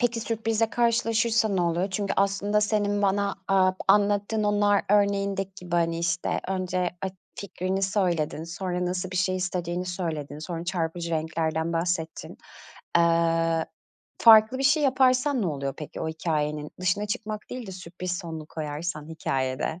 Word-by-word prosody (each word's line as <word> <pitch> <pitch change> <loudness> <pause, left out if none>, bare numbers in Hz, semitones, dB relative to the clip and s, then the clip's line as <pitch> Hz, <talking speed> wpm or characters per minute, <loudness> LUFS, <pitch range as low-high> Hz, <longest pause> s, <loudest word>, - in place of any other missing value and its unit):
Peki, 240 -2 +1
sürprizle 225 0 0
karşılaşırsa 230 -1 +2
ne 195 -3 0
oluyor? 175 +3 0
Çünkü 200 +1 -1
aslında 200 +1 +2
senin 205 -1 +1
bana, 200 0 +1 0.2
eee, 185 -1 +4
anlattığın 205 +2 +3
o 205 0 +1
nar 205 -1 +4
örneğindeki 200 -1 +1
gibi, 175 -1 -5
hani, 165 -1 +1
işte, 170 0 -1
önce 185 -1 -1
ak 190 -1 -2 0.3
fikrini 190 -1 -3
söyledin, 175 -6 0
sonra 180 +1 -3
nasıl 180 +1 -2
bir 185 - -4
şey 185 0 +1
istediğini 180 -1 -2
söyledin, 160 -5 -4
sonra 165 +2 -5
çarpıcı 170 -1 -2
renklerden 160 0 -1
bahsettin. 165 -1 -2 0.6
Iıı, 165 -1 +2 0.5
farklı 220 +2 +7
bir - - -1
şey 300 +3 +4
yaparsan 260 -1 +3
ne - - 0
oluyor 140 -4 -3
peki? 150 - -7
O 160 - -2
hikâyenin 150 -2 -2
dışına 195 +3 +1
çıkmak 215 0 -4
değil 250 -2 -6
de 190 - -7
sürpriz 180 0 -5
sonlu 160 -4 -7
koyarsan 155 0 -5
hikâyede. 135 0 -2
185 Hz, 150 wpm, -26 LUFS, 165-205 Hz, 0.6 s, farklı